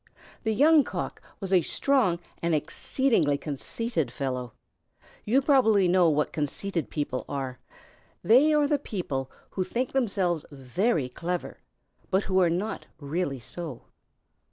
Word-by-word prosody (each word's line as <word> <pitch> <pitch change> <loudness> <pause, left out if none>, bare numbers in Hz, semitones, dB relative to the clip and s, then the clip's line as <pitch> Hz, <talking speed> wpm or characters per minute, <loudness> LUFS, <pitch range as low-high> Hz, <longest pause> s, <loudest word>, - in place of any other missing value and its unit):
The 220 - 0
Young 300 +4 +6
Cock - - -5 0.2
was 195 -1 -3
a 180 - +6
strong 235 - +2 0.2
and 170 -1 +1
exceedingly 160 - +1
conceited 155 - -3
fellow. 125 -2 -4 0.7
You 260 +6 +3
probably 225 -9 +4
know 175 -1 +4
what 150 -1 0
conceited 165 +4 -3
people 145 -4 -2
are. 135 -2 -4 0.6
They 255 - +6
are 300 -1 +4
the 290 0 +1
people 145 - -4 0.2
who 190 - -1
think 245 +7 -2
themselves 195 - 0
very 145 - 0
clever, 175 +8 -4 0.5
but 195 0 +2
who 190 -1 +1
are 180 -2 +4
not 185 +6 -3
really 145 -1 -2
so. 135 +3 -7
180 Hz, 130 wpm, -27 LUFS, 145-225 Hz, 0.7 s, Young